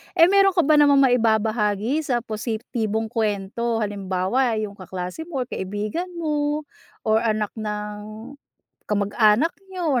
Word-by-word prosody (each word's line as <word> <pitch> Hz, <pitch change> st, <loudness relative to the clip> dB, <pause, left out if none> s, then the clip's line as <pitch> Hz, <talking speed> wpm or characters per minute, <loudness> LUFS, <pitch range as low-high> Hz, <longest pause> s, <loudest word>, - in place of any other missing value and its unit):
Eh 340 Hz, +2 st, +6 dB
meron 390 Hz, -1 st, +5 dB
ka 345 Hz, -, +4 dB
ba 300 Hz, +1 st, +4 dB
namang 285 Hz, -1 st, +6 dB
maibabahagi 220 Hz, 0 st, +2 dB
sa 240 Hz, -3 st, 0 dB
positibong 220 Hz, 0 st, -3 dB
kwento, 225 Hz, +1 st, -1 dB
halimbawa 205 Hz, +4 st, 0 dB
yung 210 Hz, -2 st, -4 dB
kaklase 185 Hz, -, -6 dB
mo 275 Hz, -7 st, -2 dB
or -, -, -13 dB
kaibigan 210 Hz, -, -3 dB
mo, 300 Hz, -2 st, -1 dB, 0.4 s
or 220 Hz, 0 st, +3 dB
anak 215 Hz, -2 st, 0 dB
ng 210 Hz, +2 st, -6 dB, 0.6 s
kamag-anak 210 Hz, +8 st, +3 dB, 0.2 s
niyo, 330 Hz, -9 st, 0 dB
220 Hz, 125 wpm, -23 LUFS, 210-280 Hz, 0.6 s, Eh